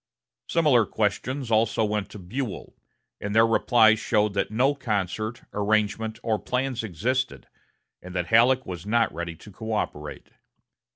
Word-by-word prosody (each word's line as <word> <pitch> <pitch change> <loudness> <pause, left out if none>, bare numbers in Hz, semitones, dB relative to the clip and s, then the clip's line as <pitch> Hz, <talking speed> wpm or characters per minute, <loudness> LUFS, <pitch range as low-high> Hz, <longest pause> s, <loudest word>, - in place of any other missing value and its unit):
Similar 145 -9 +3
questions 120 +5 -2
also 110 0 +2
went 105 -1 -2
to - - -10
Buell, 105 +5 -5 0.4
and 105 +1 -4
their 110 0 +7
replies 110 -1 +4
showed 105 -2 +1
that 100 - 0
no 125 +6 +2
concert, 110 -3 -3
arrangement, 110 +1 0
or 110 -2 0
plans 125 -1 -2
existed, 125 +7 -2 0.6
and 90 0 -10
that 90 -1 0
Halleck 125 +3 +5
was 90 -2 -6
not 115 +2 +1
ready 85 0 -5
to 105 - -14
coöperate. 100 -9 -4
110 Hz, 135 wpm, -25 LUFS, 100-120 Hz, 0.6 s, their